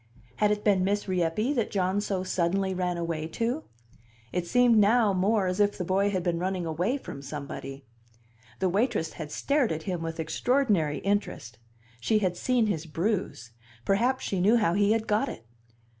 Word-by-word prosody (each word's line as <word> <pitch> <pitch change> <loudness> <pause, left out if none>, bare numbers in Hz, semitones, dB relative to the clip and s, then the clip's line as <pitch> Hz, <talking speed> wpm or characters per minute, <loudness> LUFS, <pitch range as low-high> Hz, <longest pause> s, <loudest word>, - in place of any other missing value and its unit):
Had 210 - +3
it 210 0 -1
been 195 -3 +3
Miss 205 +2 0
Rieppe 185 - 0
that 235 -6 0
John 190 +1 0
so 195 -3 -2
suddenly 190 +1 0
ran 180 -1 -1
away 165 -2 -3
to? 235 - -2 0.7
It 180 -1 -2
seemed 245 +1 +4
now 210 0 +4
more 195 +2 +2
as 185 +2 -2
if 205 0 +2
the 180 - -2
boy 195 +3 +2
had 185 -3 -1
been 170 -1 0
running 185 -1 -2
away 175 - -1
from 140 - -8
somebody. 140 -1 -7 0.7
The 190 - +1
waitress 200 -3 0
had 150 -3 -7
stared 280 - +1
at 160 0 -3
him 180 -2 -3
with 165 0 -5
extraordinary 170 - +1
interest; 195 - -2 0.4
she 215 - +2
had 185 -4 0
seen 245 +3 +1
his 165 -6 -2
bruise; 170 - -2 0.3
perhaps 245 +7 +1
she 190 -2 -1
knew 215 +6 +5
how 210 -7 +2
he 205 +2 +3
had 225 -1 -1
got 210 0 +1
it. 115 - -9
190 Hz, 180 wpm, -27 LUFS, 170-215 Hz, 0.7 s, knew